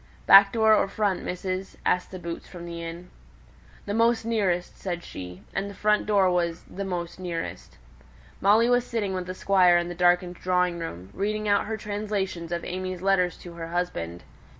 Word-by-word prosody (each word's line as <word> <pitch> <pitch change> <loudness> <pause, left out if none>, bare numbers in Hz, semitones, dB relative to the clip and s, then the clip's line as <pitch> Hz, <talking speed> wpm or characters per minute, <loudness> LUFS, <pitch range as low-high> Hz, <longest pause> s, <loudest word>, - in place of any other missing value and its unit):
"Back 195 0 +9
door 220 -1 +4
or 210 - +3
front, 200 -1 0
missus?" 185 +1 -4
asked 180 - +1
the 185 - -7
boots 170 -1 -6
from 175 -2 -9
the 170 -1 -6
inn. 170 +2 -8 0.7
"The 205 - -3
most 230 0 +2
nearest," 195 -6 0
said 175 -2 -4
she. 90 +1 -9
And 195 +1 -2
the 200 - -10
front 210 0 +2
door 195 -3 +4
was 170 -1 -1
"the 200 - -6
most 180 -2 -4
nearest." 170 -2 -5 0.6
Molly 215 +4 +5
was 245 0 +3
sitting 220 -5 -2
with 185 -1 -3
the 185 - -5
Squire 185 -3 +4
in 175 0 -1
the - - -4
darkened 175 0 +2
drawing 180 -1 +1
room, 95 - -7
reading 215 +2 -2
out 205 0 +2
her 220 0 -2
translations 205 -5 -3
of 170 0 -2
AimÄe's 185 0 -4
letters 185 -2 +2
to 175 - -11
her 165 -1 -6
husband. 125 - -3
185 Hz, 185 wpm, -26 LUFS, 175-205 Hz, 0.7 s, Back